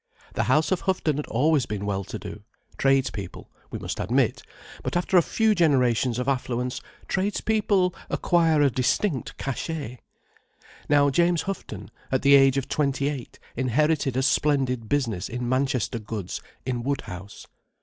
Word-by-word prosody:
The - - 0
house 155 0 +2
of 185 - +1
Houghton 170 -6 0
had 150 - -4
always 140 +1 +2
been 100 -1 -4
well 100 -1 -1
to - - -6
do: - - -8 0.3
tradespeople, 135 -9 -1 0.2
we - - -5
must - - -5
admit; - - +1 0.4
but - - -2
after 180 +2 -1
a 175 - +8
few 220 +5 +2
generations 130 - +2
of 125 +1 -2
affluence, 125 -2 -1 0.3
tradespeople 200 -1 +1 0.2
acquire 165 -3 +3
a 140 - +3
distinct 130 - -1
cachet. 135 -2 -4 0.9
Now 145 -1 +4
James 170 +3 +2
Houghton, 105 - -6 0.2
at 130 - +1
the 140 0 +6
age 135 -1 +6
of 135 - -1
twenty 140 -1 0
eight, 140 -5 -7 0.2
inherited 135 +2 +1
a 130 - +1
splendid 130 -5 +1
business 115 -10 -1
in 125 0 -4
Manchester 130 -2 0
goods, 105 -3 -5 0.2
in 125 -2 -2
Woodhouse. 105 -8 -5
135 Hz, 150 wpm, -25 LUFS, 120-155 Hz, 0.9 s, a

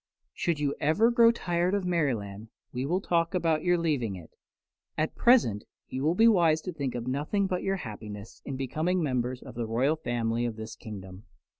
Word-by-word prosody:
Should 170 -4 -1
you 145 -1 0
ever 160 +11 +3
grow 235 -1 +6
tired 180 -4 0
of 200 -2 -1
Merryland 115 - -1 0.2
we 130 +2 -2
will 180 +5 0
talk 170 0 +1
about 165 -3 +1
your 175 0 +3
leaving 140 - 0
it. 85 -3 -11 0.7
At 155 +1 0
present 230 - +4 0.3
you 130 - -4
will 155 +4 +2
be 225 +4 +6
wise 170 -8 +4
to 185 - -5
think 140 -5 -3
of 120 -1 -4
nothing 150 +10 0
but 185 -2 -1
your 195 0 0
happiness 105 - -8
in 140 - -5
becoming 160 +7 0
members 125 -2 -1
of 130 - -10
the 115 -1 -3
royal 130 +7 +2
family 120 -4 -1
of 115 - -4
this 110 0 -7
kingdom." 95 -2 -9
145 Hz, 190 wpm, -28 LUFS, 115-175 Hz, 0.7 s, grow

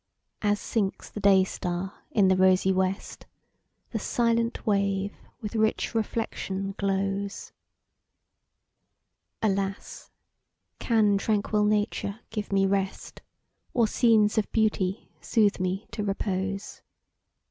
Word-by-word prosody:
As 205 -1 +2
sinks 200 -4 -2
the - - -6
day 195 -2 +5
star 180 +1 -4 0.2
in 200 -4 +3
the 190 - +4
rosy 185 0 +4
west, 190 +1 -2 0.6
The 220 - -2
silent 230 +1 0
wave, 200 -1 0 0.3
with 210 -1 -5
rich 220 +1 +1
reflection 200 -3 -2
glows: 195 0 -2 1.9
Alas! 195 -1 -2 0.7
can 210 -4 +3
tranquil 210 0 +1
nature 210 0 0
give 210 -2 -4
me 195 0 +3
rest, 195 0 -2 0.5
Or 235 -3 +4
scenes 220 -2 +3
of 210 - -3
beauty 210 -3 0
soothe 210 -4 +2
me 185 +3 -2
to 210 - -3
repose? 195 0 -3
200 Hz, 105 wpm, -27 LUFS, 195-215 Hz, 1.9 s, day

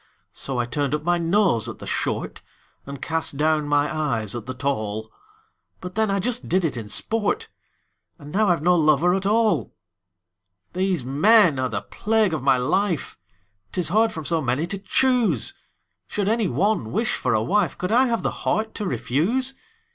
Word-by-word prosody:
So 135 -2 -4
I 120 - +1
turned 145 +3 -1
up 150 - -5
my 175 +1 +1
nose 170 - +2
at 120 - -8
the - - -10
short, - - -2 0.5
And 140 -1 -7
cast 160 -3 -1
down 155 0 +1
my 145 +1 +1
eyes 115 -9 -1
at 120 -1 -6
the 130 - -3
tall; 110 -5 -3 0.7
But 180 - -7
then 220 +1 +1
I 195 - +1
just 245 +5 -3
did 185 0 +2
it 150 - -1
in 110 -3 -6
sport 225 - -1 0.7
And 145 -3 -11
now 210 +4 +2
I've 170 -4 +1
no 180 +1 +4
lover 155 +2 +3
at 195 +1 -1
all! 220 0 +1 1.0
These 185 -6 0
men 170 - +4
are 130 -1 0
the 100 -3 -3
plague 215 - 0
of 155 - -2
my 135 -1 +3
life: 160 +6 0 0.6
'Tis 180 -2 -1
hard 220 +5 +3
from 160 -2 -6
so 165 0 +1
many 130 +4 0
to 195 +2 -4
choose! 220 - +1 0.5
Should 205 -2 -2
any 220 -1 +1
one 200 - 0
wish 220 +4 0
for 125 -3 0
a 110 - +1
wife, 205 - +1
Could 180 - -3
I 255 +3 +4
have 230 -2 -1
the - - 0
heart 220 0 -2
to 210 - -4
refuse? 225 - 0
170 Hz, 185 wpm, -23 LUFS, 135-210 Hz, 1.0 s, no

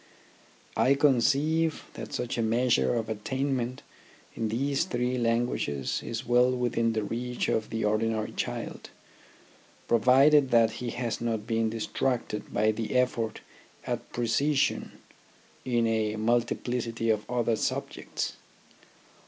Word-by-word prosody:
I 135 - +4
conceive 145 +4 +2
that - - -8
such 125 -1 -3
a 120 - 0
measure 115 - +2
of 115 -2 -1
attainment 125 +3 -2 0.5
in 110 -1 -2
these 135 +6 0
three 125 -6 -1
lan 115 0 +2
guages 70 - -2
is 115 +2 -5
well 125 +1 +4
within 115 -2 +1
the 110 -1 -1
reach 125 +3 -3
of 110 -1 0
the 115 -1 -2
ordinary 110 +1 0
child, - - -5 1.0
provided 135 +5 +5
that 115 -2 +4
he 125 - -2
has 120 -2 -3
not 110 -3 -2
been 115 -1 +1
distracted 115 0 -2
by 110 +1 +2
the 110 +3 -4
effort 120 -3 0 0.4
at - - -4
precision 135 +5 +1 0.7
in 120 -2 +1
a 110 -1 0
multiplicity 115 0 0
of 105 -1 -2
other 120 -2 +1
subjects. - - -3
120 Hz, 125 wpm, -28 LUFS, 110-125 Hz, 1.0 s, provided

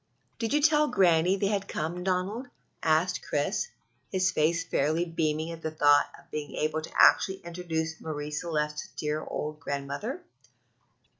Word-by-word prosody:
"Did 225 -1 -1
you 295 0 +2
tell 300 -1 +5
Granny 180 - +4
they 200 - -1
had 200 -1 -1
come, 170 +3 -3
Donald?" 190 +7 -1 0.3
asked 165 +3 +2
Chris, 150 - -1 0.4
his 185 -1 +2
face 165 +2 +2
fairly 160 +2 +1
beaming 160 -1 -1
at 165 -1 -8
the 160 - -2
thought 145 -2 +4
of - - -20
being 150 -1 -5
able 155 +1 0
to 155 - -9
actually 190 0 +6
introduce 165 -2 -3
Marie 150 -1 -4
Celeste 150 -1 -2
to - - -6
the - - -30
dear 150 0 -2
old 150 0 -4
grandmother. 140 - -4
165 Hz, 160 wpm, -28 LUFS, 150-185 Hz, 0.4 s, actually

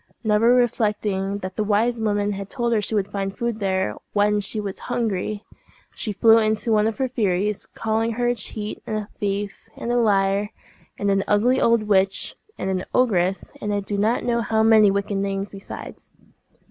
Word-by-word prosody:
Never 220 +3 +4
reflecting 210 -5 0
that 185 0 -6
the 215 - +1
wise 225 +3 +1
woman 205 -1 0
had 200 0 -5
told 235 -1 0
her 215 - +2
she 210 +2 -1
would 205 -1 -1
find 195 -1 -3
food 235 -2 -2
there 190 - 0 0.2
when 210 0 +3
she 205 +2 -1
was 200 -2 -5
hungry, 215 -3 -2 0.5
she 215 - -4
flew 225 +3 +5
into 215 +1 0
one 215 0 +3
of 220 -1 -3
her 265 - 0
furies, 210 -4 -1
calling 225 +1 -1
her 240 +2 -1
a 240 - +3
cheat, 215 -3 -3
and 215 - -1
a 210 0 -5
thief, 200 0 -3
and 235 - -3
a 245 - +2
liar, 200 -2 +2 0.5
and 200 0 0
an 195 0 +2
ugly 235 +5 +3
old 230 -1 +3
witch, 195 -2 +1 0.2
and - - -3
an 185 -1 -1
ogress, 195 -7 +1
and 210 - -2
I 205 - +1
do 200 +1 -4
not 215 +4 +1
know 235 -1 +1
how 220 0 +1
many 220 -2 +6
wicked 200 0 -1
names 195 0 -2
besides. 195 -1 -9
210 Hz, 190 wpm, -23 LUFS, 200-225 Hz, 0.5 s, many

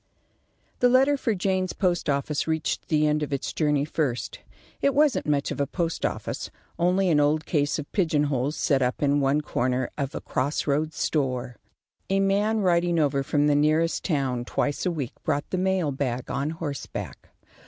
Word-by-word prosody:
The 245 - +5
letter 265 +3 +4
for 230 -5 -1
Jaynes's 185 0 0
Post 175 -5 0
office 145 +2 -1
reached 160 -1 -1
the 155 -1 +2
end 150 0 +1
of 150 - -3
its 140 - -2
journey 150 -2 +1
first. 125 -7 -2 0.4
It 280 -1 +2
wasn't 295 - +3
much 145 -1 +1
of - - -2
a 140 - 0
post 165 +1 -1
office; - - -5 0.3
only 180 +2 +2
an 155 -3 +4
old 150 +1 +2
case 145 -3 0
of 150 -2 -7
pigeon 160 -6 +2
holes 140 +1 -1
set 140 -3 +1
up 125 +3 0
in 145 0 +3
one 140 +2 +2
corner 125 -3 -1
of 140 -1 -3
a - - -4
cross 140 +4 -1
roads 155 +2 0
store. 130 -4 -1 0.5
A 195 0 +2
man 205 +3 +2
riding 175 -2 +2
over 140 -3 +2
from 145 +1 +1
the 150 - +4
nearest 155 +3 +2
town 135 -7 0
twice 145 +7 -1
a - - +1
week 145 -8 -4
brought 145 -2 -1
the 185 - 0
mail 185 -5 +1
bag 130 -2 -3
on 140 +2 -1
horseback. 155 -4 -6
150 Hz, 185 wpm, -25 LUFS, 140-175 Hz, 0.5 s, The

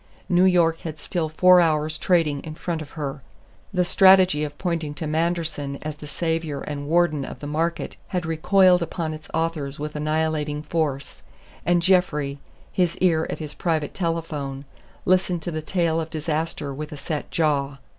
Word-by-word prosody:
New 180 +1 +4
York 170 -3 +3
had 155 -2 -6
still 160 +1 -2
four 180 +3 +6
hours' 155 -1 +1
trading 165 -6 +2
in 155 +1 -8
front 165 -1 -3
of 150 - -8
her. 140 -2 -4 0.5
The 180 -2 +1
strategy 185 -5 +6
of 145 -1 -5
pointing 165 -5 -2
to 160 - -4
Manderson 155 -3 -1
as 155 -1 -5
the 150 - -9
savior 160 -2 -2
and 145 -1 -5
warden 160 -3 +2
of - - -7
the - - -7
market 165 +3 -2
had 180 -2 -2
recoiled 180 +3 +4
upon 165 -1 -3
its 155 0 -10
authors 155 -3 -2
with 150 +1 -5
annihilating 155 -1 -1
force, 150 -4 -2 0.5
and 175 -1 +3
Jeffrey, 150 -7 +2 0.3
his 180 -3 +1
ear 165 -3 +2
at - - -3
his 150 -2 -5
private 160 -4 -1
telephone, 155 -6 -3 0.4
listened 180 -2 +2
to 175 - -3
the 155 -1 -3
tale 165 0 0
of 160 - -5
disaster 155 -2 -3
with 150 +3 -6
a 150 - -7
set 150 +1 -4
jaw. 145 -4 0
160 Hz, 170 wpm, -24 LUFS, 150-170 Hz, 0.5 s, four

